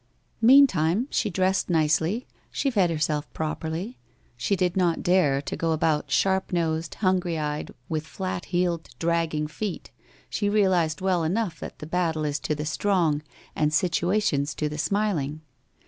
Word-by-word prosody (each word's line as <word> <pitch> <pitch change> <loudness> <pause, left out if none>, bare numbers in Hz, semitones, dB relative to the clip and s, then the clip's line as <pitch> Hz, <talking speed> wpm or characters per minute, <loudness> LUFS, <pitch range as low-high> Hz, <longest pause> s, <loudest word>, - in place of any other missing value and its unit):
Meantime 230 - +5
she 215 - +1
dressed 190 +1 +1
nicely, 160 +7 +1 0.2
.she 275 - -1
fed 195 -7 +3
herself 155 -2 -1
properly, 160 +7 -4 0.4
she 125 +12 0
did 180 -2 0
not 175 -3 +1
dare 150 -7 +3
to - - -4
go 165 -1 0
about 155 -1 0
sharp 190 -1 +1
nosed, 165 -2 -1
hungry 185 -4 +1
eyed, 150 -1 -3 0.2
with 155 -1 -3
flat 185 -2 -4
heeled 175 -2 -1
dragging 165 -2 0
feet, 175 +5 -5 0.4
she 205 -2 -1
realised 185 -6 +2
well 185 -3 +1
enough 180 0 -1
that - - -8
the - - -8
battle 160 -2 0
is 145 0 -1
to 150 - -2
the 150 +1 -4
strong 160 -2 +1 0.3
and 150 -1 +1
situations 175 -3 +1
to 150 - -1
the 150 - -5
smil 200 +1 +1
ing. 150 +3 -6
170 Hz, 155 wpm, -25 LUFS, 155-190 Hz, 0.4 s, Meantime